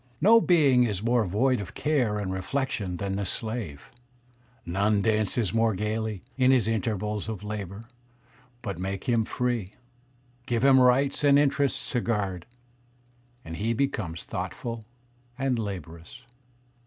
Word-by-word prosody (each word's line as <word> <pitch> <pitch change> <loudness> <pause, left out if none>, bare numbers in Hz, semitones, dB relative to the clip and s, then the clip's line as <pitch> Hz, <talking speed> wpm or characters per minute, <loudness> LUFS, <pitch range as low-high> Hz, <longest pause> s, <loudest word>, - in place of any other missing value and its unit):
No 225 +6 +6
being 145 -10 +4
is 105 -4 -1
more 120 0 +3
void 125 +7 +1
of 100 - -7
care 130 -8 +1
and 95 -2 -3
reflection 95 -2 -2
than 100 +1 -2
the 100 - -1
slave; 105 - -5 0.7
none 100 +3 +1
dances 110 -2 +1
more 115 -2 +2
gayly, 105 0 -2
in 130 -1 +4
his 125 -5 +4
intervals 105 -1 -2
of 105 -2 -5
labour; 105 -1 -5 0.8
but 100 -6 -4
make 95 +1 -3
him 115 -3 +1
free, 120 -6 -2 0.7
give 120 +1 +1
him 135 -1 +7
rights 135 +3 +3
and 140 -1 +6
interests 140 -1 +1
to 125 -4 0
guard, 100 -7 -2 1.0
and 80 +1 -6
he 115 +3 0
becomes 110 -11 -2
thoughtful 110 +5 -5 0.5
and 130 -3 0
laborious." 90 +1 -7
110 Hz, 135 wpm, -27 LUFS, 100-125 Hz, 1.0 s, him